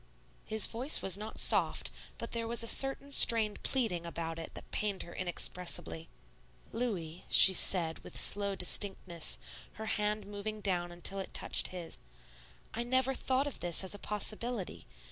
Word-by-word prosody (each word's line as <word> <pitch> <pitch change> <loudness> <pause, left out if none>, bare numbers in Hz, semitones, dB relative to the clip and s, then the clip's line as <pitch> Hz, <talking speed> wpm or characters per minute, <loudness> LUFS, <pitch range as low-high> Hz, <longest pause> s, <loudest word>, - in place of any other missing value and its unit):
His 220 -1 0
voice 250 +6 +5
was 190 -2 +1
not 215 +2 -9
soft, - - +1 0.3
but 230 - -8
there 230 -1 -4
was 235 0 -2
a - - -6
certain 270 +3 0
strained 225 -6 +9
pleading 225 -10 -1
about 165 -1 -7
it 165 - -10
that - - -12
pained 205 -3 -3
her 170 - -12
inexpressibly. 175 -2 -3 0.6
"Louis," 185 -9 -5
she 190 - +6
said, 170 -3 +1
with - - -7
slow 200 -1 +1
distinctness, 180 -2 -1 0.4
her 220 - -9
hand 210 -1 -3
moving 205 +1 -7
down 180 -4 -1
until 175 +3 -3
it 190 - -9
touched - - 0
his, 175 -3 -9 0.7
"I 235 - -4
never 260 +2 -1
thought 260 +1 -2
of 290 - -7
this 175 +1 +1
as 190 - -1
a 205 - -6
possibility. 210 - -5
205 Hz, 160 wpm, -31 LUFS, 175-230 Hz, 0.7 s, strained